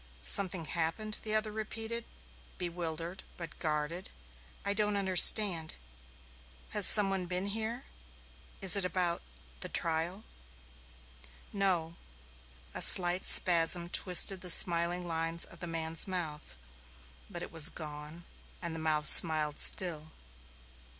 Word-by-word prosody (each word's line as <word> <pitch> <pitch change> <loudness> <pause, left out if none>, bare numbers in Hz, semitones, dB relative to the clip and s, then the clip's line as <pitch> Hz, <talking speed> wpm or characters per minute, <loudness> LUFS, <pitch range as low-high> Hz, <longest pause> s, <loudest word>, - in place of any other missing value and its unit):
"Something 180 - +3
happened?" 170 +7 -4
the 215 0 -2
other 215 0 -3
repeated, 225 +2 -7 0.5
bewildered 170 0 -7
but 170 -3 -11
guarded. 155 +3 -5 0.6
"I 200 - -2
don't 210 0 -2
understand. 190 -2 +2 0.9
Has 205 -2 +5
some 205 -2 +3
one 185 -2 -5
been 180 +2 -3
here? 225 +4 -6 0.8
Is 190 0 +6
it 200 - -1
about 180 -1 -3 0.4
the - - -5
trial?" 170 +5 -3 1.3
"No." 180 -5 -3 0.8
A - - -6
slight 180 0 +5
spasm 170 0 +2
twisted 185 +1 +2
the 180 - -7
smiling 175 +1 +2
lines 165 0 -3
of 170 - -18
the 175 - -8
man's 165 0 -3
mouth, 155 - -7 0.7
but - - -9
it - - -11
was 160 0 +3
gone 150 +1 -11 0.4
and 170 -2 -7
the 165 - -8
mouth 155 -1 -3
smiled 155 -3 +7
still. 160 -4 +3
175 Hz, 120 wpm, -29 LUFS, 160-195 Hz, 1.3 s, smiled